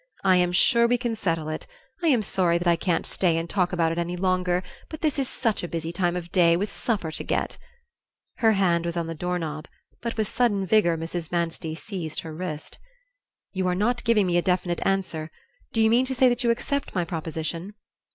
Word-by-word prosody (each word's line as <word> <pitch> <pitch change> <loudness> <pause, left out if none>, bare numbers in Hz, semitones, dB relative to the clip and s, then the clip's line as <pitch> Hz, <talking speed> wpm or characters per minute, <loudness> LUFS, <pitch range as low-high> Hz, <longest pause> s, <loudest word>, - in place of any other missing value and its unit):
"I 190 -2 +5
am 180 0 +2
sure 235 +6 +5
we 245 +1 +3
can 240 -2 -2
settle 165 -7 -1
it. 155 0 -5 0.3
I 335 - +1
am 250 -8 +4
sorry 180 -4 +2
that 175 +1 -2
I 170 - +5
can't 170 +1 0
stay 170 -3 +1
and 165 +1 -2
talk 180 0 0
about 165 -2 +1
it 165 - -2
any 175 +1 -2
longer, 180 -1 +1 0.3
but 315 - -8
this 300 -3 +1
is 270 - 0
such 225 -4 0
a 175 - -3
busy 165 -1 -3
time 175 0 0
of 175 -1 -5
day, 170 -2 +5
with 205 +3 -2
supper 205 -9 -2
to - - -4
get - - -1 0.4
" - - -58
Her 225 -2 +5
hand 175 -4 +2
was 170 0 -3
on 170 - 0
the 165 - -4
door 180 +3 -2
knob, 155 -2 -5 0.3
but 230 -1 -4
with 215 -2 +1
sudden 205 -5 +1
vigor 180 -4 +3
Mrs. 165 0 -4
Manstey 165 -2 -2
seized 170 -4 -5
her 160 -1 -8
wrist. 155 -2 -6 0.7
"You 185 -1 0
are 180 - +1
not 235 +5 0
giving 230 -4 +3
me 175 -1 +2
a - - +4
definite 180 -1 0
answer. 185 -5 -1 0.4
Do 225 - -1
you 220 0 +5
mean 250 +3 +4
to 265 - -2
say 255 +1 +5
that 245 +1 0
you 235 - +2
accept 280 +3 -1
my 175 -2 +1
proposition?" 165 +3 -4
180 Hz, 225 wpm, -25 LUFS, 170-215 Hz, 0.7 s, I